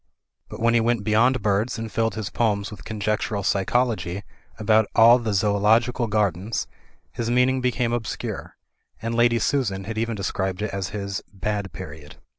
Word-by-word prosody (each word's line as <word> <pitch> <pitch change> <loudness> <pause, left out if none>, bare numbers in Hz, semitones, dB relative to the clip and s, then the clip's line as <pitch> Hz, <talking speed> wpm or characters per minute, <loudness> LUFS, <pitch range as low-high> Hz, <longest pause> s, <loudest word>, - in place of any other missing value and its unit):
But, - - -8
when 115 +1 +3
he 120 - +5
went 115 -2 +1
beyond 115 +3 +3
birds 105 +5 +1
and 115 -1 -5
filled 115 0 0
his 110 -3 -4
poems 105 -3 0
with 105 -1 -10
conjectural 105 -1 -2
psychology 100 -2 0 0.3
about 110 0 +3
all 115 +2 +7
the 115 -2 -2
Zoological 110 +4 +2
Gardens, 105 0 0 0.5
his 115 -1 -3
meaning 125 +2 +3
became 125 -1 0
obscure; 115 -2 -4 0.4
and 115 +1 -3
Lady 120 0 +3
Susan 110 -5 0
had 110 +3 -4
even 115 0 -1
described 95 0 -2
it 105 - -2
as 100 -2 -2
his 100 0 -4
bad 100 0 -3
period. 75 -5 -9
110 Hz, 160 wpm, -24 LUFS, 100-115 Hz, 0.5 s, all